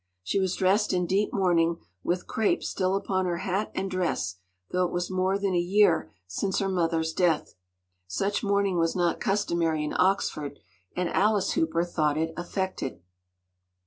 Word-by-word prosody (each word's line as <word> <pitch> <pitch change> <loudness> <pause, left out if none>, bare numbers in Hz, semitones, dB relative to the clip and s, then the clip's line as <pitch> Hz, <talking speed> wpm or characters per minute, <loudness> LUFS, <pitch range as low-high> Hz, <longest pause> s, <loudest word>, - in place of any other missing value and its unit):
She 100 - 0
was 190 -1 0
dressed 195 +3 +2
in 180 -1 +1
deep 195 +4 +1
mourning 170 -3 +2 0.3
with 180 +1 -1
crape 220 -2 0
still 185 0 0
upon 190 -1 0
her 175 -1 -1
hat 190 +4 -2
and 195 - -1
dress, 95 - -1 0.3
though 180 0 +2
it 180 - -1
was 175 +1 -2
more 185 +1 +1
than 200 -2 -1
a 175 - +3
year 185 -1 +3
since 140 - -2
her 195 - 0
mother’s 165 -3 0
death. 170 -4 +1 0.5
Such 195 - -1
mourning 200 -3 +1
was 165 0 +1
not 175 -2 +1
customary 170 -7 0
in 150 - -3
Oxford, 155 -6 +1 0.4
and 180 -1 0
Alice 205 -1 +2
Hooper 165 +1 +1
thought 155 -4 0
it 160 +1 -1
affected. 175 - -4
180 Hz, 165 wpm, -27 LUFS, 165-195 Hz, 0.5 s, a